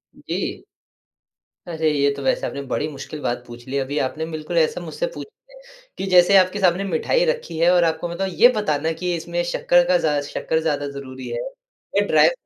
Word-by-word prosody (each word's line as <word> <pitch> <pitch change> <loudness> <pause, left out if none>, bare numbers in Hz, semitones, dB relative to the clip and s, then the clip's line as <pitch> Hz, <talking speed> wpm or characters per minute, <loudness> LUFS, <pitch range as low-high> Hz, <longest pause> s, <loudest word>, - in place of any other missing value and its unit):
जी। - - -4 1.0
अरे! 160 -2 0
ये 140 -1 +2
तो 140 - -7
वैसे 130 - +1
आपने 140 - -5
बड़ी 150 +3 -1
मुश्किल 150 +1 -8
बात 120 0 -2
पूछ 120 0 -11
ली। 140 +2 -2
अभी 140 +2 -2
आपने 155 +5 -2
बिल्कुल 155 - -5
ऐसा 470 -2 +2
मुझसे - - -3
पूछ - - -7 0.7
कि - - -3
जैसे 180 +1 +6
आपके 185 +2 +3
सामने 185 +1 +2
मिठाई 195 - +1
रखी 475 - -2
है 170 - +5
और 175 -1 +4
आपको 165 +1 0
मतलब 190 +3 -2
ये 240 - +9
बताना 160 -6 0
कि 180 -1 -1
इसमें 170 +1 -3
शक्कर 175 0 +3
का 180 - +4
ज़ा 150 -4 +1
शक्कर 160 +2 -2
ज़्यादा 145 -3 -1
ज़रूरी 130 -2 -8
है - - -3 0.6
या - - +3
ड्राइव - - +5
160 Hz, 195 wpm, -22 LUFS, 145-180 Hz, 1.0 s, ये